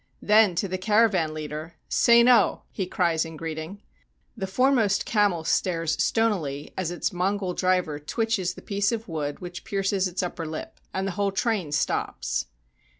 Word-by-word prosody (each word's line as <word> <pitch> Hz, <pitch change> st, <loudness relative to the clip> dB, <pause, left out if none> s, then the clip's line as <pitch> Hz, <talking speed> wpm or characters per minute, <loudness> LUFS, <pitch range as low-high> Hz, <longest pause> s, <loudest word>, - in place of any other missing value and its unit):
Then 210 Hz, -3 st, +5 dB
to 185 Hz, +4 st, 0 dB
the 185 Hz, 0 st, -3 dB
caravan 205 Hz, -5 st, +3 dB
leader: 155 Hz, +1 st, -6 dB
"Sein 235 Hz, 0 st, +5 dB
oh!" 250 Hz, -2 st, +4 dB
he 190 Hz, -3 st, -3 dB
cries 170 Hz, -3 st, +1 dB
in 165 Hz, -1 st, -8 dB
greeting. 165 Hz, +5 st, -6 dB, 0.5 s
The 195 Hz, -5 st, -4 dB
foremost 225 Hz, -1 st, +2 dB
camel 205 Hz, -7 st, +2 dB
stares 165 Hz, -1 st, 0 dB
stonily 170 Hz, -11 st, 0 dB
as 185 Hz, -3 st, -2 dB
its 175 Hz, +3 st, -2 dB
Mongol 185 Hz, +1 st, -1 dB
driver 180 Hz, -5 st, 0 dB
twitches 190 Hz, +2 st, -1 dB
the -, -, -12 dB
piece 200 Hz, +1 st, 0 dB
of 225 Hz, -1 st, -4 dB
wood 150 Hz, -4 st, -4 dB
which 175 Hz, -1 st, -7 dB
pierces 195 Hz, -1 st, 0 dB
its 185 Hz, +1 st, -3 dB
upper 175 Hz, -2 st, -4 dB
lip, 155 Hz, 0 st, -7 dB
and 190 Hz, 0 st, -2 dB
the 195 Hz, -, -1 dB
whole 200 Hz, +1 st, 0 dB
train 195 Hz, -5 st, -1 dB
stops. 60 Hz, -, -1 dB
185 Hz, 160 wpm, -25 LUFS, 165-205 Hz, 0.5 s, Then